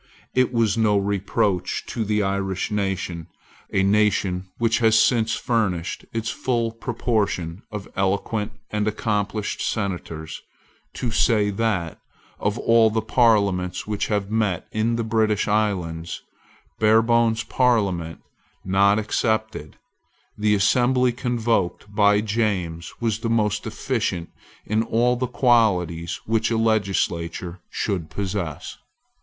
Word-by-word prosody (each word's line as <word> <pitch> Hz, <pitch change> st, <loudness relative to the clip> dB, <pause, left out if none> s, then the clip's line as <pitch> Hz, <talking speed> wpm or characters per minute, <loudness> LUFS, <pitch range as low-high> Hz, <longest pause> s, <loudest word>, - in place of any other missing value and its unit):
It 130 Hz, -1 st, +3 dB
is 115 Hz, -2 st, +1 dB
no 105 Hz, -2 st, +3 dB
reproach 100 Hz, -1 st, 0 dB
to 115 Hz, -, -3 dB
the 105 Hz, 0 st, 0 dB
Irish 95 Hz, -1 st, -2 dB
nation, 95 Hz, -5 st, -2 dB, 0.4 s
a 95 Hz, -, +2 dB
nation 100 Hz, -2 st, +1 dB
which 115 Hz, 0 st, +1 dB
has 110 Hz, -2 st, +4 dB
since 115 Hz, -1 st, +3 dB
furnished 100 Hz, -8 st, -1 dB
its 115 Hz, 0 st, -2 dB
full 115 Hz, -3 st, -1 dB
proportion 110 Hz, -7 st, -2 dB
of 105 Hz, -2 st, -6 dB
eloquent 100 Hz, +3 st, -1 dB, 0.2 s
and 105 Hz, 0 st, -1 dB
accomplished 105 Hz, -1 st, -2 dB
senators, 90 Hz, -6 st, -3 dB, 0.5 s
to 120 Hz, -, -2 dB
say 105 Hz, -3 st, +2 dB
that, 100 Hz, -6 st, -1 dB, 0.4 s
of 105 Hz, +2 st, -1 dB
all 115 Hz, -1 st, +4 dB
the 110 Hz, 0 st, -1 dB
parliaments 100 Hz, -6 st, +2 dB
which 105 Hz, -1 st, -2 dB
have 105 Hz, -1 st, -1 dB
met 105 Hz, -5 st, 0 dB
in 110 Hz, +2 st, 0 dB
the 115 Hz, -, -1 dB
British 110 Hz, -2 st, +1 dB
islands, 90 Hz, -6 st, -1 dB, 0.6 s
Barebone's 115 Hz, +1 st, +3 dB
parliament 100 Hz, -10 st, 0 dB, 0.4 s
not 100 Hz, +2 st, +4 dB
excepted, 110 Hz, -5 st, -1 dB, 0.6 s
the 105 Hz, 0 st, +2 dB
assembly 125 Hz, +5 st, +3 dB
convoked 115 Hz, -5 st, -1 dB
by 105 Hz, 0 st, +4 dB
James 100 Hz, -7 st, -2 dB
was 110 Hz, -2 st, -1 dB
the 115 Hz, -, -2 dB
most 105 Hz, -2 st, +1 dB
deficient 110 Hz, -6 st, -2 dB, 0.3 s
in 110 Hz, +1 st, +1 dB
all 120 Hz, +2 st, +2 dB
the 125 Hz, +1 st, -2 dB
qualities 95 Hz, -, +2 dB
which 110 Hz, 0 st, +1 dB
a 115 Hz, -, 0 dB
legislature 95 Hz, -5 st, -1 dB
should 90 Hz, -7 st, -2 dB
possess. 95 Hz, -5 st, -4 dB
105 Hz, 120 wpm, -23 LUFS, 95-115 Hz, 0.6 s, has